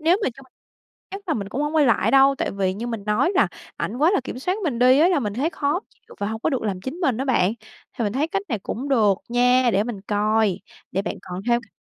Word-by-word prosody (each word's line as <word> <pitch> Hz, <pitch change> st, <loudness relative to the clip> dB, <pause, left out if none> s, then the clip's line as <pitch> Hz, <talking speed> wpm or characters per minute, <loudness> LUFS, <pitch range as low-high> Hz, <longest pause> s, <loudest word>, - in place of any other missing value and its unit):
nếu 340 Hz, +4 st, +4 dB
mà -, -, +2 dB
trong 270 Hz, -1 st, -15 dB, 0.6 s
chắc 395 Hz, +1 st, -7 dB
là 315 Hz, -, +1 dB
mình 200 Hz, -2 st, -4 dB
cũng 280 Hz, +7 st, -3 dB
hông 295 Hz, +2 st, -2 dB
quay 295 Hz, -3 st, +5 dB
lại 230 Hz, -, +3 dB
đâu, 275 Hz, 0 st, +6 dB
tại -, -, -1 dB
vì 190 Hz, -1 st, -1 dB
như 230 Hz, +4 st, -5 dB
mình 225 Hz, -4 st, -4 dB
nói 210 Hz, -, +2 dB
là -, -, +4 dB, 0.3 s
ảnh 225 Hz, -, -3 dB
quá 315 Hz, +5 st, +4 dB
là -, -, +2 dB
kiểm 250 Hz, -, -6 dB
soát 365 Hz, +10 st, -1 dB
mình 270 Hz, -8 st, -1 dB
đi 255 Hz, +2 st, +5 dB
á, 340 Hz, -, +6 dB
là 360 Hz, -, +2 dB
mình 210 Hz, -3 st, -3 dB
thấy 285 Hz, +7 st, 0 dB
khó 295 Hz, +2 st, -1 dB
chịu -, -, -19 dB
và 200 Hz, -, -1 dB
hông 220 Hz, 0 st, -5 dB
có -, -, 0 dB
được 265 Hz, -5 st, -1 dB
làm 195 Hz, -4 st, -2 dB
chính 260 Hz, +9 st, -5 dB
mình 270 Hz, -10 st, +1 dB
á 265 Hz, -, -1 dB
bạn. 215 Hz, -7 st, +2 dB, 0.5 s
Thì 230 Hz, -, 0 dB
mình 205 Hz, -, -1 dB
thấy 290 Hz, +5 st, 0 dB
cách 390 Hz, +4 st, -2 dB
này 225 Hz, -5 st, -1 dB
cũng 255 Hz, +8 st, -5 dB
được 220 Hz, -7 st, +4 dB
nha, 245 Hz, +1 st, +3 dB
để 200 Hz, +2 st, +2 dB
mình 230 Hz, -5 st, -5 dB
coi, 210 Hz, 0 st, +1 dB, 0.3 s
để 195 Hz, -, 0 dB
bạn -, -, -3 dB
còn 180 Hz, +1 st, -7 dB
theo 235 Hz, 0 st, +3 dB
cách 210 Hz, -5 st, -21 dB
245 Hz, 280 wpm, -23 LUFS, 210-285 Hz, 0.6 s, đâu